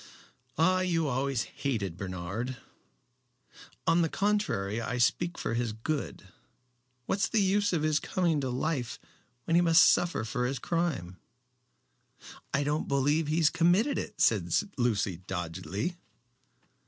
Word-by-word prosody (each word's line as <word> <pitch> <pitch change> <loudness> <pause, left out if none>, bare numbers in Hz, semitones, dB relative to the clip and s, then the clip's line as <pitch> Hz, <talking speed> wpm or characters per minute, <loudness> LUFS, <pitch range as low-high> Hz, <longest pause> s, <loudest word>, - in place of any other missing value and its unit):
"Ah! 185 +4 +3
You 170 -4 +1
always 135 -2 0
hated 110 - -3
Bernard." 95 +7 -4 1.3
"On 170 +1 +4
the 165 - +1
contrary, 170 - 0
I 125 +2 -3
speak 170 +8 +1
for - - -2
his 115 -2 -1
good. 140 +6 -4 0.8
What's 200 - 0
the 225 - +2
use 205 +1 +2
of 165 -4 0
his 155 -1 +2
coming 170 -5 0
to 130 - -2
life 125 -1 -2 0.5
when 165 - -2
he 170 - +6
must 165 0 +6
suffer 175 -10 +2
for 125 +3 -1
his 135 +2 -2
crime?" 135 - -2 1.3
"I 140 - +1
don't 150 +2 -1
believe 145 +3 +1
he 160 +2 +1
committed 185 - +3
it," - - -7
said - - +3 0.3
Lucy, 105 - 0
doggedly. 95 - -4
140 Hz, 130 wpm, -29 LUFS, 115-170 Hz, 1.3 s, he